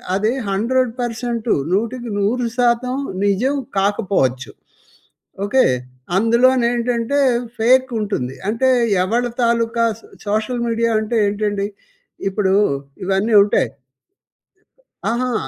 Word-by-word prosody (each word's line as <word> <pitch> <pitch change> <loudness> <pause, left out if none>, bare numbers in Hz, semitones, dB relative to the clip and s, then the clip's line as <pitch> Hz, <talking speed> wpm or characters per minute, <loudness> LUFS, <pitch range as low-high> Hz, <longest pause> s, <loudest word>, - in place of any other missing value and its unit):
అది 215 +4 +1 0.2
100% 235 +1 -1 0.2
100% 235 +2 0 0.3
నిజం 235 +8 +1 0.2
కాకపోవచ్చు. 190 - 0 0.9
ఓకె. 260 +5 +3 0.5
అందులోని 235 +3 +3
ఏంటంటే 240 +3 0 0.4
ఫేక్ 255 +3 +3
ఉంటుంది. 135 -12 -3
అంటే 260 +4 +1 0.3
ఎవరి 240 +5 0
తాలుకా 230 0 +1
సో - - -18 0.2
సోషల్ 220 +4 -1
మీడియా 230 0 +1
అంటే 225 +2 -1
ఏంటండి 205 -1 -1 0.6
ఇప్పుడు 190 -1 0 0.5
ఇవన్నీ 195 +4 0
ఉంటాయి. 205 - +1 1.4
అహా! 245 +1 -1
230 Hz, 85 wpm, -19 LUFS, 205-245 Hz, 1.4 s, ఓకె